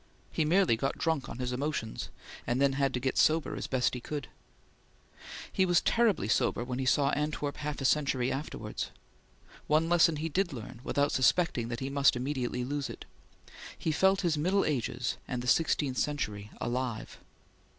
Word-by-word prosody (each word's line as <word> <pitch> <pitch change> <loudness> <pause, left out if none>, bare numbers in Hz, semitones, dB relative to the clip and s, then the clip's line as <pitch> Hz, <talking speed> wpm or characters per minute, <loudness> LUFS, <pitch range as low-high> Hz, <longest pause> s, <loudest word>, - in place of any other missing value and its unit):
He 155 - 0
merely 175 -5 +4
got 135 +4 -2
drunk 160 -4 -1
on - - -7
his 125 0 -2
emotions, 135 -4 -3 0.4
and 120 +2 +1
had 140 0 +3
then 135 -1 +1
to 125 - -2
get 130 +1 0
sober 160 0 +3
as - - -4
he - - -8
best 130 -1 +1
could. 145 +1 -5 1.2
He 190 - +2
was 175 -1 +4
terribly 225 - +2
sober 120 - +1
when 125 +1 -4
he 130 - -1
saw 140 +2 +3
Antwerp 150 -1 -2
half 150 0 -4
a - - -2
century 130 -3 +2
afterwards. 145 +3 -4 0.8
One 155 +2 +3
lesson 170 -2 +5
he 155 +2 -2
did 175 +2 0
learn 120 0 -8
without 145 +1 +1
suspecting 130 -3 +2
that 115 +1 -5
he 135 +1 -3
must 140 -2 +4
immediately 125 -1 -2
lose 145 +1 -2
it. - - -9 0.7
He 160 - -1
felt 190 +5 +3
his 165 -5 +1
middle 190 +6 +2
ages 125 -3 -1
and 125 -2 -3
the - - -5
sixteenth 145 -2 +2
century 105 -9 -2
alive. 120 -2 -3
140 Hz, 175 wpm, -30 LUFS, 125-155 Hz, 1.2 s, lesson